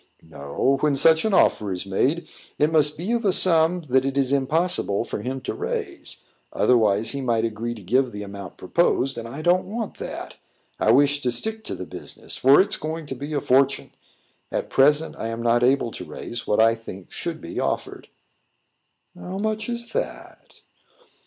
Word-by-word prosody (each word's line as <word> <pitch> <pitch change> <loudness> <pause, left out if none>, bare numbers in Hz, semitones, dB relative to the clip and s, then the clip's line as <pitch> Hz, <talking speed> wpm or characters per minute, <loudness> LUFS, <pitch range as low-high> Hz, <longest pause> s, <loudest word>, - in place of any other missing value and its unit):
"No. 80 - -1
When 150 -2 +2
such 160 +6 +4
an 215 - +1
offer 105 - +3
is 90 +1 -3
made, 135 - 0 0.3
it 150 +2 +2
must 150 -2 +2
be 180 +8 -3
of 235 0 0
a 200 - +3
sum 175 -1 +5
that 130 +1 +3
it 135 0 -2
is 135 -1 +1
impossible 140 - 0
for - - -5
him 130 +1 -4
to - - -4
raise; - - -5 0.3
otherwise, 110 -2 +2
he 140 - -4
might 115 -3 +1
agree 115 +1 -4
to 105 - -12
give 125 +6 +1
the 105 0 -6
amount 100 -2 -9
proposed, 135 - +1
and 115 0 -6
I 140 +6 -7
don't 180 +2 +2
want 220 +1 -5
that. - - -7 0.4
I - - +2
wish 145 +3 +4
to 125 - 0
stick 220 - -2
to - - -3
the 95 - -7
business, - - -8
for 135 +2 +5
it's 200 +2 +2
going 160 +1 -5
to 135 - -6
be 145 +4 -6
a 145 - +1
fortune. 135 +2 +2 0.6
At - - -3
present, 150 +4 +3
I - - -3
am 115 +1 -4
not 120 0 +3
able 125 -1 +2
to - - -7
raise 120 - -6
what 105 - +1
I 115 +1 +5
think 100 -5 -10
should - - -5
be - - -6
offered." - - -3 1.1
"How 185 +1 -7
much 215 +2 -2
is 235 0 -4
that?" - - -6
135 Hz, 190 wpm, -23 LUFS, 115-165 Hz, 1.1 s, sum